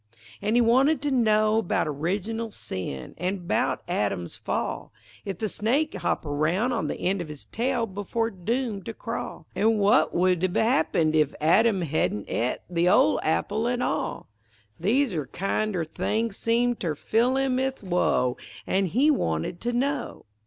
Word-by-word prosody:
An' 210 +3 0
he 240 - +5
wanted 260 +6 +4
to 290 - 0
know 215 -3 +3
'bout 175 - 0
original 200 +10 -2
sin; 90 - -6
An' 185 +2 0
about 175 -3 -1
Adam's 100 - -2
fall; - - -3 0.3
If 195 -3 -4
the 215 - -1
snake 265 +10 0
hopped - - -2
aroun' 160 - 0
on 240 - -1
the - - -4
end 190 +1 0
of 170 - -5
his 150 -2 -9
tail 245 0 -1
Before 220 +3 -2
doomed 215 +2 -3
to 225 - -5
crawl, 230 - -5
An' 220 +2 +2
w'at 205 0 +4
would 180 -1 +2
hev 185 +1 0
happened 160 -8 +2
if 155 -2 +2
Adam 195 +6 +4
hedn' 140 -9 -1
et 120 +2 -1
The 175 0 +2
ol' - - +4
apple 210 +8 0
at 245 0 0
all; - - -2 0.5
These 240 - +2
ere 150 -5 -2
kind 195 - -1
er 165 -2 -1
things 220 +6 -2
seemed 235 +2 +1
ter 160 -4 -2
fill 240 - +1
him 265 -1 +1
'ith 265 -3 -2
woe, 175 -9 +1 0.3
An' 195 0 +1
he 265 - +3
wanted 80 - -1
to 240 - -1
know. 275 +4 -2
205 Hz, 165 wpm, -26 LUFS, 170-235 Hz, 0.5 s, he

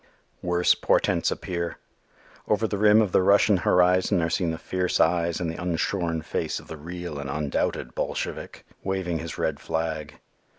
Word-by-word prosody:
Worse 90 0 +3
portents - - +1
appear. 85 -1 -3 0.7
Over 105 +1 +2
the 105 -2 -3
rim 105 +1 +6
of 100 - -2
the - - +4
Russian 100 +1 +5
horizon 90 +2 +3
are 80 - -1
seen 85 0 0
the 80 - -2
fierce 90 +2 -1
eyes 85 0 +2
and 90 - -2
the 80 +2 -5
unshorn 85 -1 -1
face - - -2
of - - -15
the - - -7
real 85 0 -6
and 70 -1 -5
undoubted 70 -4 -2
Bolshevik, - - -4 0.2
waving 95 -4 -2
his 80 0 -6
red - - -1
flag. 80 -2 -3
85 Hz, 165 wpm, -25 LUFS, 80-90 Hz, 0.7 s, rim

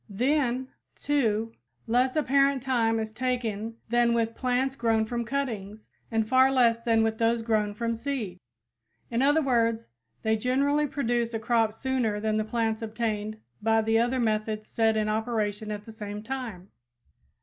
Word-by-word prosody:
Then, 255 +3 0 0.3
too, 225 -6 0 0.3
less 250 +3 +2
apparent 275 -2 +2
time 230 -4 +1
is 220 0 -3
taken 230 -3 -2
than 240 0 +3
with 230 -1 0
plants 255 +2 0
grown 225 -3 +1
from 235 +1 -2
cuttings 220 -6 -4 0.2
and 225 -2 0
far 260 +2 +5
less 235 -3 +4
than 230 -1 +2
with 220 0 -1
those 230 0 +2
grown 215 -2 0
from 230 +1 -1
seed. 230 -7 -4 0.7
In 235 +1 +1
other 290 +3 +4
words, 230 -3 +1 0.3
they 220 0 +2
generally 280 +6 +1
produce 240 -4 -1
a - - -1
crop 225 -1 +2
sooner 230 -2 -1
than 215 0 0
the 215 - +1
plants 225 0 -1
obtained 215 -1 -3 0.2
by 225 +1 +3
the 225 +1 +3
other 245 +2 +1
methods 215 -1 -1
set 225 -1 +1
in 215 0 +1
operation 215 -1 -1
at 210 -1 -4
the 225 - -9
same 210 -1 -7
time. 225 -7 -6
230 Hz, 160 wpm, -27 LUFS, 220-250 Hz, 0.7 s, far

